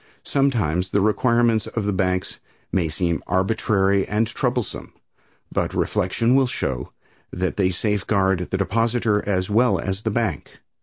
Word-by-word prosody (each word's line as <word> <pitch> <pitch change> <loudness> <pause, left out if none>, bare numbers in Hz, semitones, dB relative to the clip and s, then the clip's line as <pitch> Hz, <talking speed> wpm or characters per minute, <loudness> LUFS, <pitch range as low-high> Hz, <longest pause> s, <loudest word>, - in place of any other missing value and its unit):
Sometimes 105 - +1
the 100 - +1
requirements 115 +1 +2
of 110 -3 -3
the 105 - 0
banks 90 0 -1 0.3
may 85 -4 +1
seem 85 0 -1
arbitrary 95 0 +1
and 105 +2 +1
troublesome, 120 -1 -3 0.6
but - - -1
reflection 105 +4 +1
will 135 -1 +4
show 65 - -3 0.4
that 90 0 -2
they 95 -2 +2
safeguard 95 -1 0
the 95 - -1
depositor 110 +1 +1
as 95 0 0
well 120 +4 +3
as 95 +1 -3
the 110 - -1
bank. 105 - -2
100 Hz, 140 wpm, -22 LUFS, 95-115 Hz, 0.6 s, will